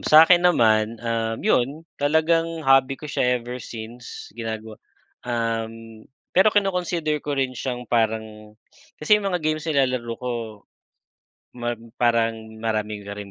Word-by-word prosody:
sa'kin 165 Hz, +3 st, +7 dB
naman, 115 Hz, -10 st, +3 dB
um, 115 Hz, -1 st, -1 dB
yun 140 Hz, +6 st, +1 dB, 0.2 s
talagang 160 Hz, +2 st, +1 dB
hobby 135 Hz, 0 st, +4 dB
ko -, -, -12 dB
siya 125 Hz, -3 st, +1 dB
ever 120 Hz, +1 st, -7 dB
since 115 Hz, +2 st, -9 dB
ginagawa, 110 Hz, -1 st, -6 dB, 0.5 s
um, 115 Hz, -1 st, -3 dB, 0.3 s
pero 190 Hz, +4 st, +6 dB
kino-consider 180 Hz, -7 st, 0 dB
ko 145 Hz, -1 st, -3 dB
rin 130 Hz, -1 st, 0 dB
siyang 125 Hz, -1 st, -4 dB
parang 110 Hz, -2 st, -2 dB, 0.4 s
kasi 210 Hz, +7 st, +3 dB
yung 200 Hz, -, -1 dB
mga 180 Hz, -4 st, -2 dB
games 155 Hz, +1 st, -1 dB
nilalaro 130 Hz, -5 st, +1 dB
ko. 125 Hz, 0 st, -4 dB, 1.2 s
Mag 120 Hz, -1 st, -3 dB, 0.2 s
parang 115 Hz, -1 st, +2 dB, 0.2 s
marami 110 Hz, -2 st, -2 dB
ka 100 Hz, -, -5 dB
ring 100 Hz, -1 st, -8 dB
125 Hz, 130 wpm, -23 LUFS, 115-155 Hz, 1.2 s, sa'kin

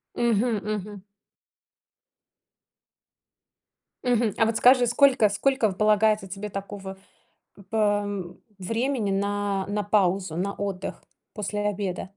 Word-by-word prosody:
Мгм, 235 Hz, -1 st, +1 dB
мгм. 205 Hz, -2 st, -5 dB, 3.0 s
Мгм. 235 Hz, -4 st, +1 dB
А 225 Hz, -, +4 dB
вот 225 Hz, 0 st, 0 dB
скажи, 250 Hz, -1 st, +5 dB
сколько 250 Hz, -4 st, +4 dB
сколько 240 Hz, +1 st, +1 dB
полагается 215 Hz, +1 st, +2 dB
тебе 195 Hz, +2 st, -6 dB
такого 195 Hz, -1 st, -7 dB, 0.7 s
пэ 205 Hz, -2 st, 0 dB, 0.4 s
времени 230 Hz, +3 st, -1 dB
на 200 Hz, 0 st, -1 dB
на 210 Hz, 0 st, -1 dB
паузу, 195 Hz, -4 st, +1 dB
на 195 Hz, +3 st, -1 dB
отдых 195 Hz, -1 st, -5 dB, 0.3 s
после 210 Hz, -1 st, -3 dB
обеда? 195 Hz, -3 st, -3 dB
205 Hz, 100 wpm, -25 LUFS, 195-225 Hz, 3.0 s, скажи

